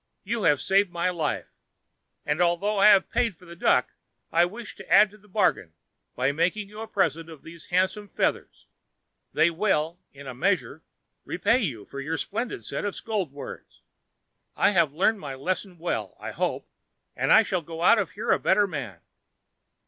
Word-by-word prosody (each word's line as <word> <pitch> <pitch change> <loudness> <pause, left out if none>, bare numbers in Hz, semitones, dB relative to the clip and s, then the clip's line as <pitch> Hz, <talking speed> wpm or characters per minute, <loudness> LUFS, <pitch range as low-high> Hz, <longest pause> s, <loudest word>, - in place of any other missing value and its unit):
You 220 +1 -2
have 145 -4 +4
saved 195 +3 +2
my 175 +1 -1
life, 160 -4 -3 0.7
and, 150 +3 0
although 180 +4 +1
I 200 - +7
have 195 -3 +5
paid 235 -5 +1
for 180 - -19
the 170 0 -11
duck, - - +2 0.4
I 170 +1 +4
wish 215 +5 -8
to - - -12
add 210 0 +7
to 210 - -16
the 210 - -23
bargain 185 - 0 0.4
by 130 +2 +1
making 180 +7 -1
you 210 +1 -9
a 225 - -6
present 165 -5 0
of 160 -3 -12
these 165 -1 -12
handsome 190 +3 0
feathers. - - -2 0.7
They 170 - +3
will, 165 -2 0
in 140 0 -13
a 130 - -6
measure, 160 +1 -1 0.4
repay 215 +8 +1
you 130 - -3
for 140 - -8
your 155 +4 -3
splendid 230 +4 -4
set - - -4
of 205 -1 -3
scold 205 -9 -3
words. 140 0 -10 0.7
I - - +3
have 170 -7 +3
learned 195 +8 +1
my 140 -5 -6
lesson 180 +6 -3
well, 170 +1 -3
I - - -6
hope, - - -2 0.5
and - - 0
I 225 - +8
shall 185 -4 -1
go 165 +1 -7
out 220 - +6
from 200 - 0
here 210 - -1
a - - +3
better 205 - +3
man. 135 - -6
180 Hz, 185 wpm, -26 LUFS, 160-205 Hz, 0.7 s, I